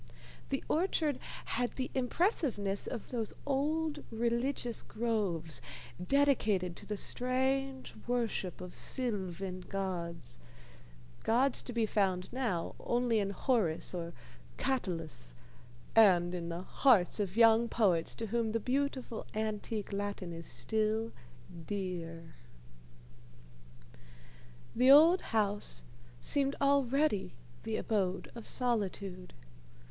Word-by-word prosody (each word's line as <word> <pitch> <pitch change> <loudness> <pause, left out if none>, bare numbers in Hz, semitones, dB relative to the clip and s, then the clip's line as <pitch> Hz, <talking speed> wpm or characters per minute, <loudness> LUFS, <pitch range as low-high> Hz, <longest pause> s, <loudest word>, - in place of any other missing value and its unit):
The 270 - -1
orchard 315 -4 +1 0.3
had 245 0 -1
the 260 -1 -3
impressiveness 250 - 0
of 235 - -5
those 230 -4 -3
old 295 +2 0
religious 235 +2 -1
groves, 200 -9 -1 0.4
dedicated 215 -8 +2
to - - -9
the 210 - -2
strange 265 +3 -1
worship 230 -7 -1
of 180 -1 -7
sylvan 190 -7 0
gods, 170 - -4 0.8
gods 245 +4 +3
to - - -7
be 230 -2 +1
found 190 -4 0
now 225 -10 -1
only 240 -2 +1
in 200 -1 0
Horace 200 -6 0
or 170 -1 -4 0.4
Catullus, 165 - -2 0.6
and 180 -5 +6
in 170 -1 -4
the 170 +2 -4
hearts 220 -5 +3
of 200 0 -2
young 230 0 +6
poets 185 -8 +2
to 230 - -4
whom 225 0 -1
the 230 - +1
beautiful 260 -1 -2
antique 215 -1 -3
Latin 200 -3 -3
is 165 -1 -7
still 215 - 0 0.6
dear. 170 -5 -4 2.4
The 255 +2 +4
old 320 +6 +8
house 210 -2 0 0.4
seemed 275 - +2
already 275 - +2 0.3
the 220 -1 -2
abode 195 -4 -1
of 235 -2 -9
Solitude. 200 -6 -2
220 Hz, 105 wpm, -33 LUFS, 185-255 Hz, 2.4 s, old